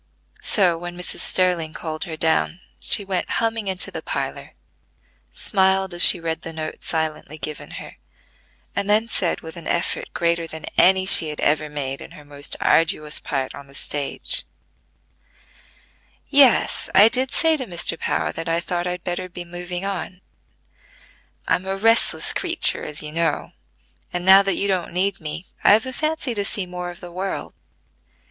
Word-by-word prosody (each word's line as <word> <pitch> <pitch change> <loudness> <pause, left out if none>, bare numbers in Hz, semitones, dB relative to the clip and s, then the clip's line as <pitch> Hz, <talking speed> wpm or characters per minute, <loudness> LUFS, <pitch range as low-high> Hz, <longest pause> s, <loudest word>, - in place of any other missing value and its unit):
So, 180 -5 +3
when 175 0 -7
Mrs. 180 - -1
Sterling 175 -4 +2
called 155 -1 -5
her 160 -2 -6
down, 160 +2 +1 0.2
she 200 - +1
went 190 -2 -2
humming 225 -2 -1
into 190 -1 0
the - - -6
parlor, - - -5 0.8
smiled 190 -2 +1
as 175 - -4
she 180 - +8
read 165 -1 -3
the 165 - -7
note 155 -1 -6
silently 155 -2 -3
given 150 -1 -6
her, - - -10 0.8
and 200 - -2
then 215 +2 +3
said 185 -6 0
with 160 +2 -9
an 170 - -8
effort 170 - -1
greater 170 -1 0
than 160 0 -8
any 190 +1 +4
she 165 -4 +8
had 150 - -6
ever 150 +1 +1
made 140 -2 -4
in - - -10
her 150 - -13
most 145 0 0
arduous 155 -2 +2
part 135 -4 -3
on 140 0 -11
the 140 - -17
stage: 145 -1 -2 1.9
"Yes, 275 -4 +4
I 200 +3 +9
did 250 +2 +1
say 320 -1 +3
to 260 -4 -6
Mr. 175 -2 0
Power - - -1
that 165 +1 -5
I 165 +1 +1
thought 175 +1 -3
I'd 180 0 -4
better 180 +1 -4
be 175 0 -8
moving 175 +1 -6
on. 190 -1 -5 1.3
I'm 185 - 0
a 195 0 -2
restless 225 +3 +2
creature - - +1
as 150 +1 -6
you 150 - -6
know; 165 -1 -1 0.6
and, 175 0 -4
now 190 +1 +9
that 195 -1 0
you 200 - 0
don't 185 -4 -1
need 195 +1 -1
me, 160 +3 -6 0.2
I've 215 +4 +5
a 260 - -6
fancy 310 -3 -1
to 205 -2 -1
see 200 -1 0
more 180 0 -6
of 175 - -11
the 175 - -9
world. 190 +2 -4
175 Hz, 170 wpm, -22 LUFS, 160-195 Hz, 1.9 s, I